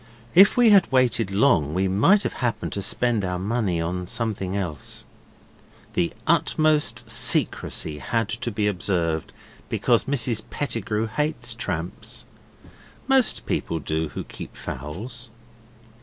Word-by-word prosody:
If 195 +6 +7
we 240 -3 +6
had 195 -7 +5
waited 125 -5 +2
long 95 - +2
we 95 +1 +1
might 150 - +4
have - - -2
happened 115 -3 -1
to 100 - -3
spend 115 +1 +1
our 90 -1 -2
money 100 -2 -1
on 90 +2 -3
something 100 -4 -2
else. 85 -7 -5 0.9
The 85 - +1
utmost 150 -7 +2
secrecy 80 -8 +2
had 105 - -1
to 115 +2 -3
be 105 -1 -1
observed, 90 -5 -1 0.4
because - - +2
Mrs 120 -5 +1
Pettigrew 115 -5 -2
hates 120 0 -2
tramps. 90 -7 -5 0.8
Most 265 -3 +2
people 85 - -2
do 80 0 -2
who - - -6
keep - - -10
fowls. 110 - -7
110 Hz, 125 wpm, -24 LUFS, 90-125 Hz, 0.9 s, If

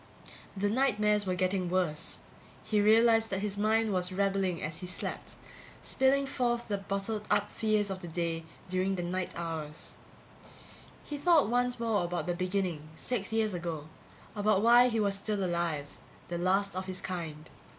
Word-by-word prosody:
The 205 +1 +1
nightmares 210 -5 +2
were 185 - +1
getting 185 0 0
worse. 175 -4 -1 0.4
He 210 -1 +1
realized 225 +1 +5
that 190 0 -2
his 205 -1 -1
mind 215 +1 +2
was 180 0 +1
rebelling 195 -2 0
as 155 0 -3
he 180 - -6
slept, 180 - -4 0.5
spilling 270 +1 +3
forth 240 -3 -1
the 200 -3 -1
bottled 200 +2 -3
up 205 - +2
fears 215 -2 +1
of 190 - -4
the 175 - -7
day 165 0 -2 0.2
during 185 +1 0
the 175 - -3
night 185 +1 -3
hours. 160 -3 -5 1.1
He 295 -1 -5
thought 325 -6 +4
once 245 0 +1
more 225 -5 +1
about 175 0 -2
the 175 - 0
beginning 180 -4 -2
six 225 -2 -3
years 220 -2 +1
ago, 165 -3 -4 0.5
about 210 -1 +2
why 240 +2 +7
he 230 -2 0
was 200 -2 +2
still 200 0 -1
alive, 170 -5 -1 0.4
the 175 0 -3
last 195 +2 +1
of 185 0 -4
his 185 0 -3
kind. 160 -4 -5
195 Hz, 165 wpm, -30 LUFS, 180-220 Hz, 1.1 s, why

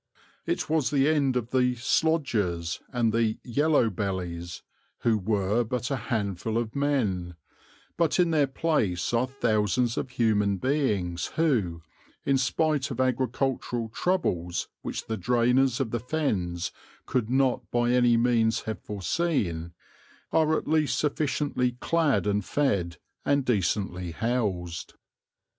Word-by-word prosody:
It - - -1
was 155 -3 +1
the 140 -1 +3
end 145 -4 +2
of 120 -1 -2
the 125 -1 +2
"slodgers" 115 - 0
and 120 -4 +1
the 115 -1 +1
"yellow 140 -1 +2
bellies," 90 -3 -4 0.4
who 115 -2 +3
were 105 +3 +1
but 125 +3 -3
a - - +2
handful 110 -1 -1
of 115 0 -2
men; 105 -12 0 0.6
but 170 0 +2
in 175 -2 +4
their 150 -3 +3
place 125 - 0
are 120 +2 +2
thousands 120 -2 +1
of - - -4
human 105 -5 +1
beings 105 - 0
who, 105 - +1 0.4
in 135 -1 +3
spite 145 +1 +1
of 130 - -6
agricultural 130 -2 0
troubles 90 - -1
which - - -5
the 110 - -3
drainers 125 +2 +2
of 125 -5 -1
the 120 - -1
Fens 100 - -1 0.3
could 120 -4 -1
not 130 0 +1
by 120 0 +1
any 120 -1 +4
means 115 -1 +2
have 110 -5 -5
foreseen, 100 - -1 0.6
are 160 -1 +3
at - - -5
least 155 -1 +2
sufficiently 145 -4 0
clad 155 +2 +1
and 105 0 +1
fed, 95 - 0 0.3
and 140 -2 +1
decently 90 -5 -1
housed. 95 -7 -2
120 Hz, 130 wpm, -27 LUFS, 100-135 Hz, 0.6 s, in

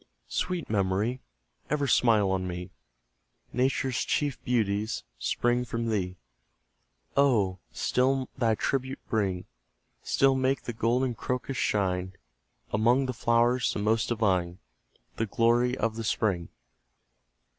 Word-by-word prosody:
Sweet 180 -2 -2
Memory! 105 +4 0 0.5
ever 145 -1 +1
smile 110 -6 +4
on 95 -1 -1
me; 90 +1 -5 0.8
Nature's 130 -1 +1
chief 145 -4 -1
beauties 110 -3 0 0.2
spring 120 - +1
from 115 -1 -3
thee; 90 -4 -1 1.0
Oh, 110 -10 +3
still 130 +1 +1
thy 115 -4 +2
tribute 130 +3 -1
bring 95 -5 0 0.6
Still 135 0 +3
make 130 0 +1
the 120 - -4
golden 120 +3 +1
crocus 125 +3 -3
shine 95 -2 0 0.6
Among 120 +5 +3
the 130 - -2
flowers 120 +2 +2
the - - -4
most 110 +2 +1
divine, 95 -6 +1 0.6
The 115 - 0
glory 120 +4 +2
of 115 -1 -1
the 115 - -3
spring. 100 -6 0
115 Hz, 115 wpm, -28 LUFS, 100-125 Hz, 1.0 s, smile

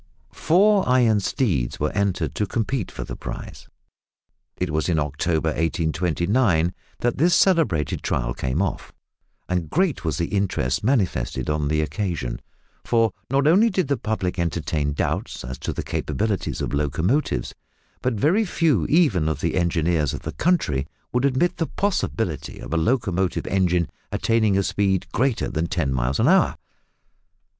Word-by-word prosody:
Four 195 -1 +3
iron 120 -4 +4
steeds 95 - -1
were 75 - 0
entered 100 -2 -1
to 105 - -1
compete 115 -1 -2
for - - -6
the - - -7
prize. - - -8 0.9
It 90 -3 -2
was 80 +3 0
in 85 - +2
October 75 +2 0
1829 85 - +1 0.3
that 120 +1 0
this 170 +4 +4
celebrated 130 - +2
trial - - -1
came 65 +10 -1
off, 95 - -4 0.6
and 90 -4 -1
great 175 - +1
was 80 -3 -1
the 85 - 0
interest 95 -11 0
manifested 85 - 0
on 75 -1 0
the 75 +1 +1
occasion, 75 - -3 0.4
for 115 -2 +2 0.2
not 135 +2 +2
only 195 +9 +5
did 185 -8 -1
the 140 - +3
public 105 -7 -2
entertain 80 -3 -1
doubts 70 - -2
as 65 +1 -6
to - - -3
the - - -4
capabilities 105 -2 -2
of - - -3
locomotives, 80 - 0 0.5
but 125 -2 0
very 165 - +3
few 160 - +1
even 115 - +3
of 80 - -2
the - - -1
engineers 85 -4 +1
of - - -7
the - - -4
country 75 - 0 0.3
would 125 +2 +2
admit 140 +7 +1
the 165 - -1
possibility 195 - -2
of - - -7
a - - +1
locomotive 95 -2 0
engine 90 -3 +1 0.2
attaining 110 -3 +2
a 100 - +2
speed 95 -1 0
greater 130 -1 +1
than 85 -2 -2
ten 70 -7 -1
miles 65 +1 0
an - - +3
hour! - - +4
95 Hz, 155 wpm, -23 LUFS, 80-125 Hz, 0.9 s, only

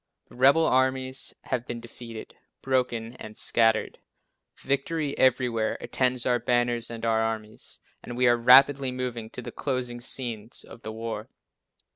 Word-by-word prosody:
The - - -15
rebel 140 +6 +5
armies 130 0 +1
have 125 -1 -3
been 120 - -4
defeated, 115 -1 -10 0.3
broken 125 -3 0
and 110 0 -9
scattered. 115 -1 +2 0.6
Victory 140 +2 -1
everywhere 120 -4 +2
attends 125 -1 0
our 125 -1 +2
banners 120 -1 0
and 115 -1 -6
our 110 -1 +2
armies, 110 -1 -4 0.2
and 120 - -8
we 125 - +3
are 120 -1 +6
rapidly 130 +3 +6
moving 125 -3 -4
to 125 - -8
the - - -6
closing 125 -3 -3
scenes 120 -3 -3
of 120 - -13
the 110 - -6
war. 110 -1 -5
120 Hz, 145 wpm, -26 LUFS, 115-130 Hz, 0.6 s, are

